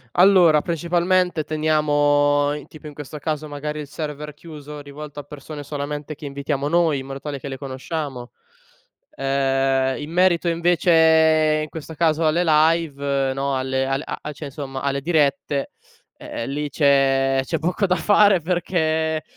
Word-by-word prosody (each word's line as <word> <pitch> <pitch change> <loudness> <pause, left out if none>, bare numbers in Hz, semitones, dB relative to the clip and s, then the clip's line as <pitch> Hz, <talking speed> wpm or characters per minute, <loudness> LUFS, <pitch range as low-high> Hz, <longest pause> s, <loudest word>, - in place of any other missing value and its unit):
Allora, 175 -5 +6
principalmente 175 0 0
teniamo 145 -2 +2
in 150 -2 -8
tipo 155 -1 -12
in 150 - -11
questo 150 +1 -8
caso 155 0 -3
magari 150 +1 -5
il 150 - -6
server 150 0 -6
chiuso, 150 -2 -10
rivolto 145 +1 -9
a - - -7
persone 145 +1 -9
solamente 145 +1 -5
che 150 0 -8
invitiamo 140 0 -3
noi, 160 -2 +2
in 130 - -7
modo 135 0 -7
tale 145 -1 -5
che 135 - -10
le 135 - -5
conosciamo. 135 -2 -5 0.8
Ehm, 135 - 0
in 150 - -7
merito 175 -1 +2
invece 160 -2 +3
in - - -10
questo 160 0 -8
caso 160 0 +1
alle 160 +3 +2
live, 150 -4 +2
no, 135 0 -1
alle 130 0 -1
a 135 +2 -3
a 150 - -5
cioè, 150 +1 -8
insomma, 135 -1 -6
alle 140 0 -1
dirette, 145 -2 0 0.5
e - - -7
ehm, 115 - -4
lì 145 +1 -3
c'è 135 -2 +3
c'è 165 +3 -2
poco 180 +5 0
da 180 - +2
fare 205 +2 +4
perché 160 -2 0
150 Hz, 160 wpm, -22 LUFS, 140-160 Hz, 0.8 s, Allora